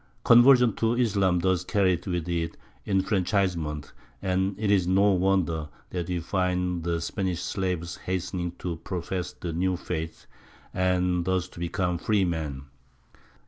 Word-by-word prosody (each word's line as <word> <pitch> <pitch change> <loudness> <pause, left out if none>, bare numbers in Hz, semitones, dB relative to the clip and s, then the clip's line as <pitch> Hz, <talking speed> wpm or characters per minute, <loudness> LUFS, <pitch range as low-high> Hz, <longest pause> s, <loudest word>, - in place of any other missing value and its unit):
Conversion 120 -1 +7
to 115 +1 +1
Islam 100 -7 +2
thus 95 -1 +1
carried 95 -3 +1
with 90 -2 -2
it 85 -1 -2 0.3
enfranchisement, 95 -6 0 0.3
and 95 +1 0
it 105 -1 0
is 95 -3 +3
no 100 +2 +4
wonder 90 -5 +1 0.2
that 90 -2 -3
we 90 -1 -1
find 90 -1 -1
the 85 0 0
Spanish 90 0 -2
slaves 90 -3 -2
hastening 90 -1 -3
to 85 -3 -4
profess 90 +1 -4
the 85 -2 -6
new 90 +2 0
faith 80 -1 -5 0.5
and 90 -1 +1
thus 95 -1 0
to - - -12
become 85 0 -1
free 105 0 +2
men. 75 -6 -3
90 Hz, 140 wpm, -27 LUFS, 85-95 Hz, 0.5 s, Conversion